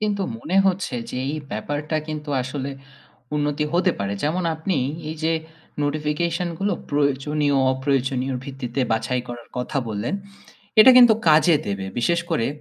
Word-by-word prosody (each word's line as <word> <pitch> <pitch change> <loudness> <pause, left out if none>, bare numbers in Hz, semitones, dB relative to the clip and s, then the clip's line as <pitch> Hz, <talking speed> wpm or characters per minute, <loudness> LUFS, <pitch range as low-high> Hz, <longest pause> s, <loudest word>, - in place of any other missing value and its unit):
কিন্তু 205 -2 0 0.2
মনে 170 +10 -2
হচ্ছে 185 -8 0 0.2
যে 125 - -4 0.2
এই 155 - -4
ব্যাপারটা 145 +8 -3
কিন্তু 150 -1 -5
আসলে 135 +1 -4 0.7
উন্নতি 145 0 0
হতে 180 +1 +3
পারে। 100 0 -1
যেমন 170 +5 0
আপনি 160 0 -1 0.3
এই 160 - -4
যে 165 - +2 0.5
notification 155 +4 -1
গুলো 200 +1 +1 0.2
প্রয়োজনীয় 145 0 +1 0.2
অপ্রয়োজনীয়র 130 -1 0
ভিত্তিতে 135 -1 -4
বাছাই 125 +3 0
করার 120 -1 -8
কথা 125 +2 -2
বললেন, 105 +3 -2 0.7
এটা 260 +4 +10
কিন্তু 240 -3 +9
কাজে 155 +1 +6
দেবে। 100 -1 -3
বিশেষ 170 +7 +2
করে 115 -8 +1
145 Hz, 145 wpm, -23 LUFS, 130-165 Hz, 0.7 s, এটা